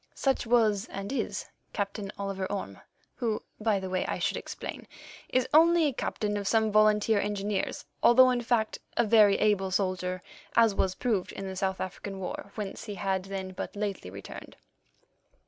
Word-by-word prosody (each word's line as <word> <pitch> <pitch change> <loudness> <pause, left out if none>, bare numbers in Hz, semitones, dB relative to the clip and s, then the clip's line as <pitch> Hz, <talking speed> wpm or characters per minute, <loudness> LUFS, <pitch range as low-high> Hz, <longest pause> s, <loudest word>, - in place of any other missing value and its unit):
Such 270 -3 0
was, 220 -2 +3
and 195 +3 -6
is, - - -2 0.3
Captain 200 -1 -3
Oliver 195 -1 -3
Orme, 145 - -5 0.4
who, 225 -3 -1 0.2
by 215 -2 +2
the 190 - -5
way, 185 0 0
I - - -1
should - - 0
explain, - - -6 0.4
is 255 -1 +1
only 330 +1 +6
a 285 - +1
captain 210 -3 -2
of 200 -1 -3
some 220 0 +3
volunteer 215 0 +4
engineers, 205 -1 -2 0.2
although, 255 +1 +7
in 245 -1 0
fact, 230 -2 0 0.2
a 235 - +4
very 210 -2 +6
able 200 -3 +2
soldier, 185 -1 -1 0.3
as 230 -3 +5
was 190 -1 0
proved 215 -7 -1
in 195 - -6
the 190 - -5
South 190 0 -1
African 195 +1 -5
War, 190 +1 -6
whence 205 -3 -5
he 210 -2 -5
had 190 -1 -1
then 190 -1 -5
but 185 - -6
lately 205 - -3
returned. 100 +1 -10
205 Hz, 170 wpm, -29 LUFS, 190-225 Hz, 0.4 s, although